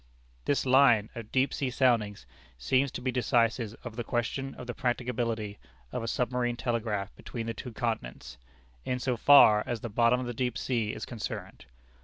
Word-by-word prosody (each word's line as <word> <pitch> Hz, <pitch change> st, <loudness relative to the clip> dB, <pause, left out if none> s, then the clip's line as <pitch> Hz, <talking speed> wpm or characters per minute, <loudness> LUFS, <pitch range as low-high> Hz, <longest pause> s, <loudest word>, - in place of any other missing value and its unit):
"This 140 Hz, -, +1 dB
line 125 Hz, -5 st, +5 dB
of 115 Hz, -2 st, -8 dB
deep 130 Hz, +1 st, +2 dB
sea 135 Hz, -, -1 dB
soundings 115 Hz, -, +1 dB, 0.3 s
seems 130 Hz, -, +1 dB
to -, -, -5 dB
be 130 Hz, +1 st, -1 dB
decisive 115 Hz, -2 st, +1 dB
of 120 Hz, -3 st, -7 dB
the 120 Hz, -, -2 dB
question 135 Hz, +3 st, -2 dB
of 125 Hz, -, -8 dB
the 120 Hz, -, -5 dB
practicability 120 Hz, -4 st, -2 dB, 0.3 s
of -, -, -3 dB
a 115 Hz, -, -4 dB
submarine 125 Hz, 0 st, 0 dB
telegraph 110 Hz, -5 st, -2 dB
between 115 Hz, -2 st, -6 dB
the 115 Hz, -, -3 dB
two 125 Hz, +3 st, -7 dB
continents, 85 Hz, -, -4 dB, 0.4 s
in 125 Hz, -, -1 dB
so 125 Hz, 0 st, -1 dB
far 110 Hz, -4 st, +7 dB
as 120 Hz, -3 st, -3 dB
the 120 Hz, -, -4 dB
bottom 115 Hz, +3 st, +3 dB
of 130 Hz, -, -3 dB
the 120 Hz, -, -4 dB
deep 125 Hz, 0 st, -2 dB
sea 115 Hz, -5 st, -1 dB
is -, -, -6 dB
concerned. 115 Hz, -4 st, -6 dB
120 Hz, 180 wpm, -29 LUFS, 110-125 Hz, 0.4 s, far